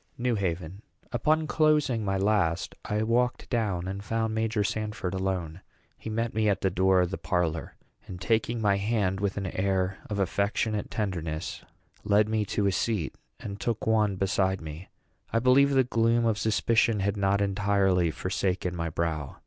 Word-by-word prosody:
NEW 125 0 0
HAVEN. 90 -2 -3 0.3
Upon 155 +7 +1
closing 150 -7 +2
my 95 -1 0
last, 95 -4 +1
I 105 +1 -1
walked 120 +2 +1
down, 100 -7 0
and 95 +1 -5
found 115 +1 -1
Major 110 -1 0
Sanford 105 -3 -3
alone. 95 -3 -2 0.3
He - - -8
met 115 +1 -1
me 110 -1 +2
at 100 -2 0
the 95 - +1
door 95 +1 +3
of 90 0 0
the 95 - -4
parlor, 85 -3 -1 0.3
and, 90 - -7
taking 115 +4 0
my 100 -2 +2
hand 100 -2 0
with 100 0 -1
an 100 - -2
air 95 0 -1
of 105 - -2
affectionate 100 +2 0
tenderness, 85 -7 -3 0.4
led 105 0 +3
me 110 -1 0
to 100 +1 -1
a 100 - +3
seat, 100 -5 -1 0.3
and 100 -1 -7
took 115 -2 -2
one 110 -3 +2
beside 95 0 +1
me. 80 +2 -9 0.4
I - - +1
believe 130 +4 +5
the 135 -2 +4
gloom 115 -1 +2
of 110 -2 +1
suspicion 110 0 +2
had 100 +1 0
not 100 0 +1
entirely 100 -3 +2
forsaken 90 +2 -2
my 85 -1 -2
brow. 80 -3 -3
100 Hz, 170 wpm, -28 LUFS, 95-110 Hz, 0.4 s, believe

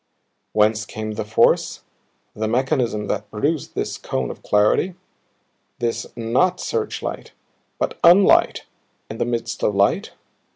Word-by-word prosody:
Whence 110 0 +3
came 110 0 -5
the 105 +1 -3
force, 110 +1 +2 0.5
the 110 0 -2
mechanism 120 -3 0
that 105 +1 -3
produced 145 +7 -2
this - - -3
cone 65 -2 -3
of - - -12
clarity, 105 - +2 0.8
this 120 -1 -2
NOT 130 +11 +1
searchlight, 450 -2 -4 0.4
but - - -3
unlight 180 +4 +5 0.5
in 110 - -7
the - - +1
midst 115 -1 -3
of 105 - +1
light? 100 0 +1
115 Hz, 125 wpm, -21 LUFS, 105-135 Hz, 0.8 s, unlight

